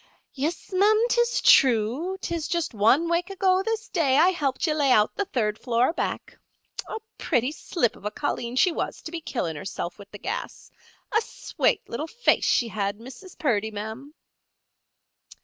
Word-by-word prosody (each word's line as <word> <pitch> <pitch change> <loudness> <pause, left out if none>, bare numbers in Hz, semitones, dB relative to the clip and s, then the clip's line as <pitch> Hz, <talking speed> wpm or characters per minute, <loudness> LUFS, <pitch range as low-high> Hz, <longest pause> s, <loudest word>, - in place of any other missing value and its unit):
"Yis, 310 +8 -4
ma'am; 425 +4 +4
'tis 475 +1 +2
true. 260 - +4
'Tis 335 -3 -3
just 340 -5 -1
one 230 +10 +3
wake 340 +2 0
ago 380 -1 +2
this 450 +2 -3
day 280 -7 +2
I 340 +5 +6
helped 290 -6 -1
ye 310 - +1
lay 285 -3 +2
out 215 -3 +4
the 405 - -1
third 215 - -1
floor, 245 +4 +1
back. - - -4 0.5
A - - -4 0.2
pretty 250 -3 +1
slip 305 - -1
of - - -17
a 210 - -1
colleen 240 -1 -3
she 355 +7 +4
was - - -3
to 315 - -7
be 335 -1 -5
killin' 175 - -3
herself 175 +2 -5
wid 200 - -11
the 205 - -8
gas—a 440 - -5
swate - - -1
little 290 +7 -4
face 480 +6 +1
she 235 - +2
had, 200 -1 -2
Mrs. 260 - -12
Purdy, 220 -7 0
ma'am." 220 +8 -7
290 Hz, 165 wpm, -25 LUFS, 230-360 Hz, 0.5 s, I